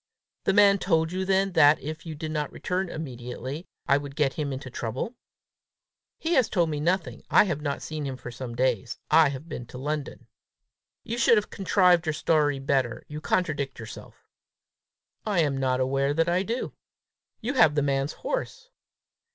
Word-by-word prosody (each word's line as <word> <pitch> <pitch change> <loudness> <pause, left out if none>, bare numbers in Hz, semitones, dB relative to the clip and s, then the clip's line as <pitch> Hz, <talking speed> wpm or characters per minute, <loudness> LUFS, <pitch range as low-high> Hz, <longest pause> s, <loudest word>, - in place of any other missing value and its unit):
"The 195 - +3
man 200 -1 +6
told 160 -3 +1
you 190 +1 -2
then, 195 0 +2
that, 150 -3 +6
if 155 +3 -7
you 160 - -5
did 155 +1 -5
not 150 -2 -2
return 185 0 -2
immediately, 130 +1 -6 0.2
I 140 - +5
would 140 -1 -7
get 145 -3 +1
him 145 -3 -3
into 130 -1 -6
trouble?" 125 - -4 1.0
"He 330 +2 -1
has 260 -7 +4
told 170 -5 +1
me 150 - -2
nothing. 175 +4 -1
I - - +7
have 170 -7 -2
not 145 -2 -3
seen 155 -2 -4
him 135 -2 -4
for 125 - -8
some 120 -1 -7
days. 120 -3 0
I 155 -1 +6
have 140 +3 -7
been 125 -6 -6
to 125 - -10
London." 145 +2 -4 0.8
"You 235 +1 -4
should 235 - +5
have 210 - -1
contrived 180 -2 +3
your 155 - +1
story 150 -2 +2
better: 135 -3 0
you 150 +1 -6
contradict 150 -7 -1
yourself." 115 -2 -11 1.0
"I 200 -5 +1
am 145 -3 +1
not 130 -1 +1
aware 135 +2 +1
that 165 +1 +2
I 175 +2 +2
do." 230 +6 -3 0.7
"You 245 +4 -2
have 160 - +5
the 145 - +2
man's 140 +1 0
horse!" - - -4
155 Hz, 180 wpm, -26 LUFS, 135-180 Hz, 1.0 s, I